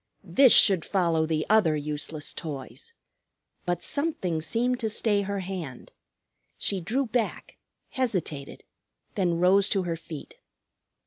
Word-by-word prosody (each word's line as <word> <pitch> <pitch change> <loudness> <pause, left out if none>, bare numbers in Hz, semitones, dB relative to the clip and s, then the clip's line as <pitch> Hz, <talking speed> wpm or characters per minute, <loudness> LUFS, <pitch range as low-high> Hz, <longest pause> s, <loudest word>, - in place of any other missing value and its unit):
This 265 -3 +5
should 190 -6 +7
follow 165 -4 +1
the 155 -1 -1
other 205 -8 +4
useless 150 0 -4
toys. 160 - -7 0.7
But 175 0 -1
something 240 - -2
seemed 245 +10 0
to 220 - -1
stay 210 -1 +1
her 200 0 -3
hand. 175 -9 -7 0.7
She 195 -2 0
drew 245 +11 0
back, 230 -1 -3 0.3
hesitated, 185 - -3 0.5
then 175 -4 0
rose 190 +3 +4
to 195 -2 +1
her 170 -2 -2
feet. 165 - -10
185 Hz, 125 wpm, -27 LUFS, 160-220 Hz, 0.7 s, should